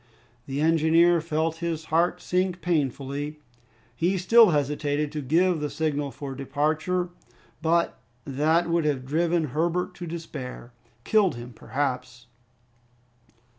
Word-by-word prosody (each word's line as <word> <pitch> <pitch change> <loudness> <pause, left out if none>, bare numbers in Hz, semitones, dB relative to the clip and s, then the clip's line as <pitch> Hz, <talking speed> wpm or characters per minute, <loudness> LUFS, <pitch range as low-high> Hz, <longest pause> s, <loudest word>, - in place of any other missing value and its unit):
The 140 +1 -2
engineer 165 +2 +4
felt 160 0 -1
his 165 -2 -3
heart 170 +2 +2
sink 180 0 0
painfully. 145 -2 -2 0.6
He 180 +7 +1
still 220 +4 +6
hesitated 145 -1 0
to 150 -1 -4
give 165 +5 +2
the 150 0 -2
signal 145 -1 -1
for 135 0 -7
departure; 155 +6 -1 0.5
but 170 +1 +1 0.3
that 155 +5 +2
would 170 -1 +1
have 135 -4 0
driven 165 +2 +1
Herbert 170 +3 0
to 175 - -7
despair 140 -7 -7 0.3
killed 205 - +3
him 120 +1 -9
perhaps. 125 -2 -3
155 Hz, 120 wpm, -26 LUFS, 145-170 Hz, 0.6 s, still